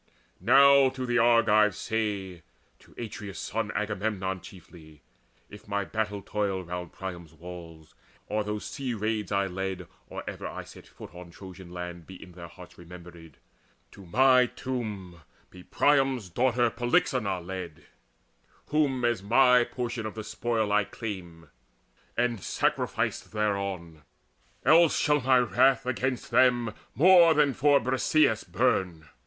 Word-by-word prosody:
Now 135 +5 +6
to 130 -1 -5
the 120 0 +1
Argives 110 -3 +4
say 100 -6 -3 0.4
to - - -21
Atreus' 105 -3 -7
son 110 0 -3
Agamemnon 100 -2 -2
chiefly 80 -5 -15 0.4
if 105 - -14
my 100 -1 -2
battle 105 -2 -3
toil 100 -3 -2
Round 90 -1 -6
Priam's 85 -4 -8
walls, 80 -1 -11 0.3
and 105 0 -1
those 105 0 -5
sea 130 -4 -4
raids 105 -2 -2
I 100 0 +1
led 95 0 -5 0.2
Or - - -7
ever - - -6
I - - -7
set - - -14
foot - - -13
on 90 -1 -11
Trojan 95 0 -12
land, 90 -1 -8
Be 95 - -11
in 90 - -13
their 85 -1 -10
hearts - - -15
remembered, 85 -3 -13 0.5
to 100 - -14
my 130 +5 +4
tomb 105 -10 -6 0.3
Be 90 - -13
Priam's 135 -4 +1
daughter 120 +2 +1
Polyxeina 120 -4 0
led 90 -2 -8 0.9
Whom 140 -5 +1
as 120 -5 0
my 125 +4 +5
portion 120 -3 -4
of 110 - -8
the 110 - -6
spoil 110 -1 -2
I 105 0 +3
claim 90 -7 -8 0.7
And 120 -4 0
sacrificed - - -2
thereon: 100 -6 -3 0.6
else 160 +4 +5
shall 150 -2 +2
my 130 0 +4
wrath 125 +1 +3
Against 130 0 -2
them 120 -2 +3 0.2
more 170 0 +6
than 145 -2 +3
for 145 +2 +3
Briseis 130 -1 +1
burn. 85 -5 -1
105 Hz, 135 wpm, -27 LUFS, 90-125 Hz, 0.9 s, Now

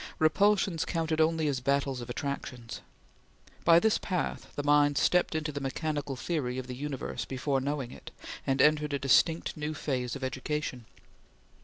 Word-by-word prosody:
Repulsions 190 +1 +3
counted 160 -2 0
only 160 -1 +2
as 140 -3 0
battle 140 -1 0
of 120 - -8
attractions. 125 -2 -5 0.8
By 165 0 +7
this 220 +3 +2
path, 180 -2 -3
the 145 - -2
mind 145 0 +4
stepped 180 -2 +3
into 155 -1 -1
the 145 -1 -5
mechanical 145 0 -2
theory 130 -3 -2
of 130 - -4
the 125 0 -6
universe 135 -3 -4
before 135 +2 -1
knowing 140 -2 -2
it, - - -10 0.4
and 135 0 +3
entered 150 -1 +3
a - - +2
distinct 145 +4 +3
new 155 0 -3
phase 130 -4 -2
of 135 - -7
education. 130 -1 -3
145 Hz, 160 wpm, -30 LUFS, 130-155 Hz, 0.8 s, By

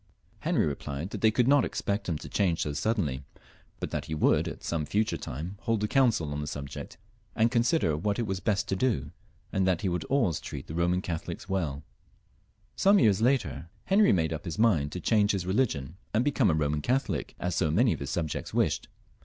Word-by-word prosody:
Henry - - +1
replied 75 +4 -4
that - - -5
they 110 - +6
could 120 +3 +2
not 140 -1 +5
expect 100 -1 -2
him 80 - 0
to - - -9
change 90 -5 +1
so 75 - -3
suddenly, 75 - -1 0.6
but - - -4
that - - -3
he 80 - -4
would 75 - +3
at - - -7
some 80 -2 -1
future 105 +8 0
time 80 +10 -6
hold 115 -3 0
a - - +2
council 115 - +2
on 75 - -3
the 75 - -4
subject, 70 -2 -7 0.4
and 115 +1 +3
con 120 -2 +3
sider 120 - +2
what 100 +6 -1
it 120 - -1
was 95 -2 -2
best 100 0 0
to 95 - 0
do; 95 - 0 0.4
and 95 -1 +2
that 95 +1 +1
he 100 - 0
would 90 -2 -2
always 115 - +1
treat 70 -2 -7
the - - -8
Boman 90 +2 +1
Catholics 85 +2 -5
welL 80 -8 -2 0.9
Some 200 +1 +5
years 105 - +4
later 120 -9 +1 0.2
Henry 200 +2 +5
made 80 -3 +1
up 80 - -6
his 85 -3 -4
mind 85 -11 +3
to 90 - -4
change 105 +2 +3
his 95 -3 -2
religion 90 - 0 0.2
and 115 +4 +2
become 140 -7 +3
a 80 - +2
Boman 75 -1 0
Catholic, 130 - -1
as 90 0 -2
so 80 - +1
many 110 +9 +3
of - - -6
his 70 - -5
subjects 80 +1 -3
wished. - - +1
95 Hz, 215 wpm, -28 LUFS, 80-110 Hz, 0.9 s, they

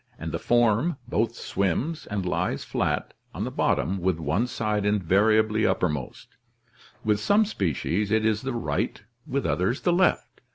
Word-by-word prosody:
]) - - -33
and - - -5
the - - -3
form 120 +6 +2
both 115 0 0
swims 100 - -2
and 100 -3 -3
lies 90 - -1
flat - - -2 0.2
on - - -3
the - - -3
bottom 95 +6 0
with 90 -1 0
one 80 - 0
side 105 -3 -1
invariably 105 +2 +3
uppermost 75 -11 -2 0.3
— - - -27
with 105 -1 +2
some 205 - +3
species 95 - -1
it 110 +1 +2
is 110 -1 +1
the 135 - -3
right, 75 0 -2 0.2
with 140 +1 -1
others 95 +8 0
the 175 - +2
left. 180 +1 +1
105 Hz, 165 wpm, -26 LUFS, 95-120 Hz, 0.3 s, invariably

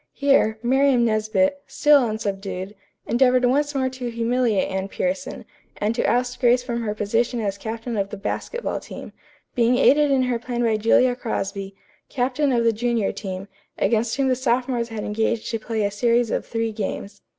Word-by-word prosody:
Here, 275 -6 +2
Miriam 260 0 +3
Nesbit, 230 +6 +1
still 295 -1 +4
unsubdued, 195 -3 -4 0.3
endeavored 250 +1 +3
once 290 +3 +1
more 260 -1 +1
to 255 -1 -5
humiliate 230 -2 +1
Anne 190 0 -2
Pierson, 275 +7 -3 0.3
and 210 +2 0
to 235 - -1
oust 245 +1 0
Grace 245 -1 +3
from 235 -2 -3
her 210 -2 -3
position 230 +4 0
as 200 -3 -2
captain 225 +3 -5
of 200 -1 -1
the 205 - -7
basketball 475 - -3
team, - - -10 0.4
being 245 -1 +3
aided 295 +3 +4
in 270 -2 +3
her 250 -2 -1
plan 240 0 -3
by 225 -2 +2
Julia 245 +3 +3
Crosby, 195 -4 -4 0.3
captain 270 +2 0
of 235 -2 +2
the 230 -1 +3
junior 230 -1 0
team, 190 -1 -6 0.3
against 225 0 +1
whom 275 -1 +1
the 255 - +2
sophomores 245 -1 0
had 220 -2 -5
engaged 220 +2 -1
to 225 - -2
play 220 -1 -2
a 200 - -1
series 235 +2 +1
of - - -2
three 225 -1 -2
games. 205 -1 -5
235 Hz, 175 wpm, -23 LUFS, 215-255 Hz, 0.4 s, still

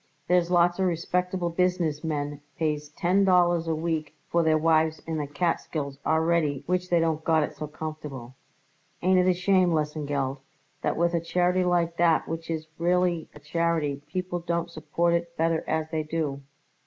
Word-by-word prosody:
There's 180 -1 +3
lots 175 0 +3
of 190 - +3
respectable 180 +1 -1
business 170 -4 0
men 145 -2 -3 0.2
pays 150 -2 -1
ten 180 +6 +2
dollars 175 -3 +3
a 160 - +1
week 155 -2 -2 0.2
for 170 - +3
their 160 -1 +3
wives 160 0 +2
in 160 -1 -2
the 145 - -3
Catskills 145 -2 -2
already 160 -3 +1
which 180 0 -1
they 175 - +4
don't 160 -1 0
got 160 -1 +3
it - - -5
so 150 - -5
comfortable. 150 -5 -7 0.7
Ain't 185 +1 +4
it 180 - +3
a - - +5
shame, 185 0 +3
Lesengeld, 145 -3 -1 0.4
that - - -1
with 170 +1 +2
a 170 - +1
charity 180 +2 +1
like 170 -1 +1
that 170 -2 +3
which 165 0 -5
is 160 -1 -2
really 175 -1 +1
a - - -11
charity, 150 -2 -1
people 180 +2 -3
don't 170 0 -2
support 170 +2 0
it 170 0 -2
better 165 0 +1
as 160 0 -1
they 160 -1 0
do?" 150 -3 -3
165 Hz, 175 wpm, -26 LUFS, 155-175 Hz, 0.7 s, a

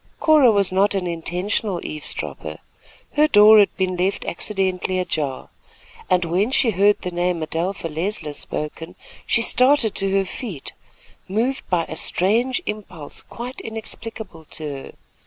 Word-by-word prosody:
Cora 305 -5 +6
was 200 -3 +2
not 200 +2 +2
an 190 -2 -1
intentional 180 +3 -2
eavesdropper. 150 -1 -5 0.5
Her 300 +1 +4
door 215 -3 +8
had 205 - +3
been 185 -1 0
left 185 +3 0
accidentally 185 0 -1
ajar, 150 -7 -3 0.6
and 180 -1 +3
when 180 +7 +1
she 255 -3 +3
heard 205 +2 +3
the 180 - -3
name 175 -1 -1
Adelpha 165 +3 -3
Leisler 165 0 -3
spoken, 160 +4 -5 0.3
she 230 - +4
started 255 -3 +4
to 195 - +1
her 195 - +1
feet, 190 - -6 0.5
moved 235 +7 -1
by 175 -2 +2
a - - -7
strange 230 +11 +1
impulse 185 -8 -6
quite 245 +2 -8
inexplicable 220 -5 -7
to 155 - -9
her. 140 -3 -6
190 Hz, 140 wpm, -22 LUFS, 170-220 Hz, 0.6 s, door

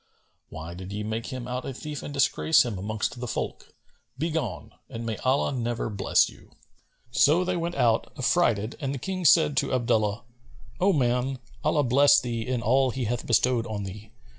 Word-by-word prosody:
Why 80 +2 -8
did 95 +2 -8
ye 105 +1 -4
make 110 +2 -3
him 130 -2 -6
out 125 0 -3
a 135 - -6
thief 150 +1 -6
and - - -7
disgrace 145 +1 +3
him 110 -6 -4
amongst 110 +4 -3
the 125 - -4
folk? - - -5 0.4
Begone, 150 - -3 0.2
and 115 0 -6
may 110 -2 -3
Allah 130 +3 +1
never 120 -3 -2
bless 100 -1 +3
you!" - - -15 0.6
So 145 +9 +4
they 185 0 -1
went 170 0 -2
out 115 -2 +2
affrighted 120 - +1
and 140 -1 -2
the - - -3
King 185 +6 -4
said 150 -1 +5
to - - +1
Abdullah, 110 -3 +1 0.6
"O 195 +2 +4
man 130 -3 +1 0.3
(Allah 150 -1 +2
bless 140 +3 +5
thee 120 -3 -3
in 125 -2 -1
all 130 +4 +3
He 130 +1 -3
hath 120 +1 -2
bestowed 120 0 +2
on 105 -2 -4
thee!) 105 +3 -9
125 Hz, 185 wpm, -26 LUFS, 110-140 Hz, 0.6 s, said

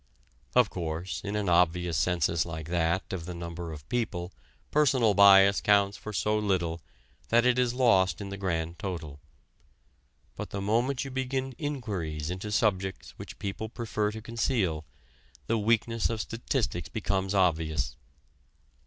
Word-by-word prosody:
Of - - +5
course, 85 +2 -4
in 100 0 -3
an 105 -2 -1
obvious 90 -1 +2
census 85 +1 +1
like 80 -1 -7
that 85 +2 0
of 85 -3 -5
the 90 - -5
number 85 0 -6
of 75 -2 -10
people 100 -6 -2 0.4
personal 130 -7 +4
bias 100 0 +7
counts 100 -1 +3
for 110 - -7
so 105 +1 +1
little 85 -5 -1 0.5
that 120 +1 +4
it 125 0 +3
is 125 -1 +1
lost 95 -9 +3
in 100 -1 -6
the 100 - -5
grand 85 -3 -2
total. 85 -8 -5 1.2
But - - -6
the 100 - -4
moment 120 +7 0
you 135 - -6
begin 130 0 -2
inquiries 95 - -3
into 95 +3 -5
subjects 95 -3 0
which - - -9
people 100 +2 -4
prefer 110 -3 -2
to 110 0 -8
conceal, 110 - -1 0.6
the 115 0 +1
weakness 115 +1 +1
of 115 -1 -2
statistics 110 - -2
becomes 95 +1 -1
obvious. 80 -9 +1
100 Hz, 145 wpm, -28 LUFS, 85-115 Hz, 1.2 s, bias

